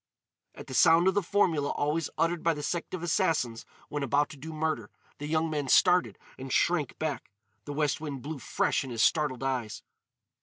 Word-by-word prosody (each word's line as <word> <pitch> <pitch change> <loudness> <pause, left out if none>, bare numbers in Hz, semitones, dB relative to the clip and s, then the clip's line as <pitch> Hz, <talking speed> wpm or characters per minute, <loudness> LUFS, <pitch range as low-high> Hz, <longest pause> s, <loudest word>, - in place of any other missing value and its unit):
At - - -9
the - - -9
sound 165 +6 +5
of 190 - +4
the 205 - +2
formula 170 -6 +1
always 150 +2 -1
uttered 165 0 +1
by 165 -1 +1
the 150 - -6
sect 170 +4 -3
of 175 - -7
Assassins 160 - 0 0.2
when 150 -1 -4
about 140 +2 +1
to - - -10
do 155 +4 -8
murder, 155 -8 -2 0.3
the 145 - -5
young 160 +1 +1
man 150 -3 -2
started 180 +4 +4 0.2
and 135 0 -7
shrank 165 -4 +1
back. 155 -3 -3 0.4
The 145 - -5
west 150 0 0
wind 140 -5 -5
blew 150 0 -5
fresh 115 - 0
in 135 - -7
his 115 -2 0
startled 145 -5 +1
eyes. 125 -5 -3
150 Hz, 195 wpm, -29 LUFS, 140-165 Hz, 0.4 s, sound